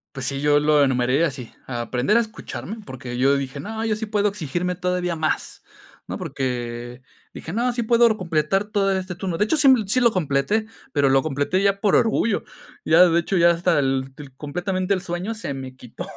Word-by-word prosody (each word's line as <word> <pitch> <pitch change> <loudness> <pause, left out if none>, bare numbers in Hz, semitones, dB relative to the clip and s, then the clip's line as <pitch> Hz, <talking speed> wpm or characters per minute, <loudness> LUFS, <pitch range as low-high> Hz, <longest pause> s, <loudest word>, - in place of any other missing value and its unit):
Pues 135 -1 -3
sí, 140 0 -3
yo 145 0 +4
lo 150 -1 +4
enumeré 130 +3 +2
así, 130 -6 -5
aprender 125 - 0
a - - +4
escucharme, 220 -1 -6
porque 125 -5 -7
yo 135 +3 +3
dije: 140 0 -4
"No, 220 +7 -5
yo 215 -1 0
sí 220 - -4
puedo 210 -1 +1
exigirme 180 -1 -3
todavía 180 -1 -1
más". 155 -1 -2 0.4
No, - - -5
porque 120 -1 -4 0.3
dije: - - -8
"No, 245 +2 +1
sí 240 0 -2
puedo 235 0 +4
completar 175 +2 0
todo 200 -2 +1
este 185 -1 -3
turno". 175 -1 -4
De 210 - +2
hecho, 320 - +1
sí 275 -3 +6
sí 235 +6 +2
lo 235 -2 +4
completé, 175 +5 0 0.3
pero 140 -2 +3
lo 135 0 +4
completé 150 +6 -1
ya 200 0 +2
por 205 - +3
orgullo. 225 -1 +1 0.4
Ya, 170 +3 +6
de 170 0 +3
hecho, 185 +3 -1
ya 170 0 +6
hasta 170 -1 +1
el 135 -1 0
el 140 -3 -11
completamente 185 +6 -2
el 190 - +1
sueño 180 +3 -4
se 215 -10 -5
me 130 -1 -8
quitó. 125 -2 -9
170 Hz, 200 wpm, -22 LUFS, 135-200 Hz, 0.4 s, sí